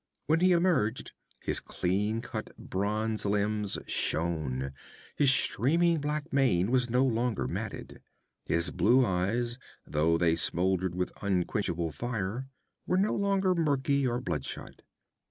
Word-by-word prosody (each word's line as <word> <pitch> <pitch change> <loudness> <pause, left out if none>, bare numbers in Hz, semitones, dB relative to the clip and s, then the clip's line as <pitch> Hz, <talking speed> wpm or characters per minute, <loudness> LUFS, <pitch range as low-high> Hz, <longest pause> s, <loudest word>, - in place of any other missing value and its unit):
When 160 +1 +2
he 185 +1 +4
emerged, 170 - +1 0.3
his - - -1
clean 105 +5 -1
cut - - -7
bronze 105 +3 -2
limbs 105 0 0
shone, 75 -5 -1 0.4
his 145 -2 +4
streaming 160 +7 +2
black 150 +1 -3
mane 120 -8 +2
was 125 -1 +2
no 125 +3 +3
longer 115 - 0
matted. - - -6 0.5
His 85 +1 +1
blue 120 +9 +4
eyes, 115 +6 -1 0.3
though 80 +2 +2
they 85 -1 +3
smoldered 90 +2 +1
with 90 0 -2
unquenchable 90 -3 -1
fire, 120 - -3 0.4
were 180 - +2
no 200 +3 +2
longer 195 -2 +2
murky 140 -4 +1
or 120 0 -1
bloodshot. 85 - -5
110 Hz, 125 wpm, -29 LUFS, 90-135 Hz, 0.5 s, he